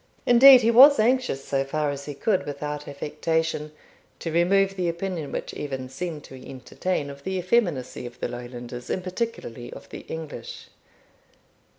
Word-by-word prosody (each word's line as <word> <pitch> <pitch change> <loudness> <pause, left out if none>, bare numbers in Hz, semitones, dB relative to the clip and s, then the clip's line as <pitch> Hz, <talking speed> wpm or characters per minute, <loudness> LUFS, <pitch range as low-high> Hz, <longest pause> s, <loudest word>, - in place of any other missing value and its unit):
Indeed 255 +1 +9
he 230 0 +3
was 275 +5 +9
anxious, 235 - +1
so 135 -1 0
far 150 +1 -1
as 140 0 -7
he 145 - -6
could 190 +4 0
without 150 +1 -5
affectation, 150 +2 -2 0.5
to 165 - -5
remove 195 +4 +2
the 180 -2 -1
opinion 170 -3 -4
which - - -5
Evan 135 -3 -5
seemed 150 +2 -5
to 130 -1 -12
entertain 140 +4 -3
of 140 0 -13
the 190 0 -2
effeminacy 175 - 0
of 120 - -13
the - - -2
Lowlanders, 120 0 -8
and 185 - -2
particularly 185 - -5
of - - -11
the - - -8
English. 160 -2 -8
155 Hz, 160 wpm, -25 LUFS, 135-190 Hz, 0.5 s, Indeed